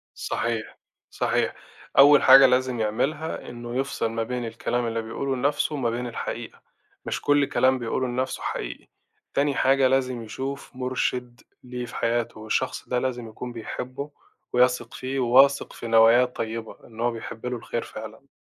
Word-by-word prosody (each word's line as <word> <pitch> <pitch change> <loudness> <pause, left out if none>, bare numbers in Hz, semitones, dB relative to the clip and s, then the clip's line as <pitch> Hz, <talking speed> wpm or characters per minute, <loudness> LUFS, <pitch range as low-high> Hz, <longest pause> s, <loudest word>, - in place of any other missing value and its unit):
صحيح، 115 -2 -3 0.3
صحيح، - - 0 0.4
أول 145 +1 +8
حاجة 135 +1 +9
لازم 125 -1 +2
يعملها 140 +9 -2
إنّه 120 0 -7
يفصل 135 -3 -1
ما 115 0 -1
بين 125 +1 -3
الكلام 115 +1 -2
اللي 115 0 -2
بيقوله 130 +4 -3
لنَفْسه 145 +3 0
وما 130 -5 0
بين 120 +2 -3
الحقيقة، 120 - -6 0.4
مش - - -3
كل 145 0 +3
كلام 130 -1 +2
بيقوله 120 +2 -1
لنَفْسه 125 +1 -2
حقيقي، - - -5 0.5
تاني 140 0 +1
حاجة 135 0 +4
لازم 130 -2 0
يشوف 135 +5 -6
مُرشد 125 -1 -2 0.2
ليه 125 -1 -5
في - - -10
حياته، 115 -1 -1
والشخص 110 +4 -2
ده 125 - +1
لازم 125 -2 -3
يكون 125 +3 -7
بيحبّه 130 +4 -6 0.4
ويثق 125 -1 +2
فيه 130 +1 -3
وواثق 135 +3 +4
في 115 - -7
نواياه 115 +2 +6
الطيّبة، 115 -2 -5
إن 115 -1 -15
هو 120 +1 +1
بيحبّ 115 0 -8
له 125 0 -2
الخير - - -4
فعلًا. - - -10
125 Hz, 155 wpm, -25 LUFS, 115-130 Hz, 0.5 s, حاجة